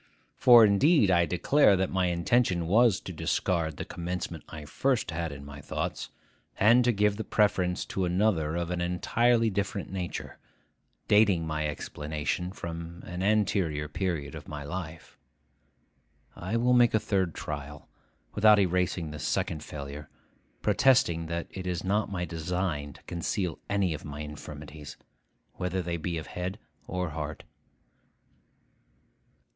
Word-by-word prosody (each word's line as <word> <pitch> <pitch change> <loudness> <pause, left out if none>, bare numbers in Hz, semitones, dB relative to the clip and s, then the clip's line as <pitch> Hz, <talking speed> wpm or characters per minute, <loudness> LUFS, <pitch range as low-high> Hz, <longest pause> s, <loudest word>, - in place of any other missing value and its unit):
For 120 -3 +8
indeed 110 - +4
I 85 -1 +4
declare 100 - +4
that 95 0 0
my 95 -1 +1
intention 90 +1 +1
was 110 +3 +4
to - - -7
discard 80 -4 -1
the - - -4
commencement 90 +1 -5
I 75 -2 -8
first 130 - 0
had 80 -1 -3
in 70 0 -9
my 70 0 -9
thoughts, - - -4 0.5
and 120 +5 +6
to 125 - +4
give 105 -1 +1
the 110 - -3
preference 95 -5 +1
to 95 - -2
another 90 -4 +1
of 85 0 -2
an 90 -1 -2
entirely 115 +6 +2
different 100 0 -3
nature, 90 -2 -5 0.7
dating 100 -6 +4
my 75 -1 -1
explanation 75 +4 -3
from 85 -2 -7
an 90 +1 -5
anterior 95 -7 +1
period 80 -3 -3
of - - -9
my 75 -1 -6
life. 80 0 -7 1.2
I 95 +6 -2
will 125 +2 +3
make 120 -2 +5
a - - +4
third 95 -6 0
trial, 75 -1 -6 0.5
without 105 0 +6
erasing 90 -4 0
this 75 - -7
second 75 -2 -1
failure, 75 0 -8 0.5
protesting 85 -12 +3
that 85 +1 -3
it 95 -1 -6
is 90 0 -2
not 100 +2 0
my 90 -2 -2
design 80 -3 -3
to - - -18
conceal 85 +1 -3
any 100 -4 +1
of 75 - -7
my 75 0 -7
infirmities, 75 0 -9 0.6
whether 90 +1 -2
they 85 0 -2
be 85 +1 -3
of 80 - -5
head 90 +2 -5 0.3
or 90 -2 -2
heart. 75 0 -5
90 Hz, 145 wpm, -28 LUFS, 80-100 Hz, 1.2 s, For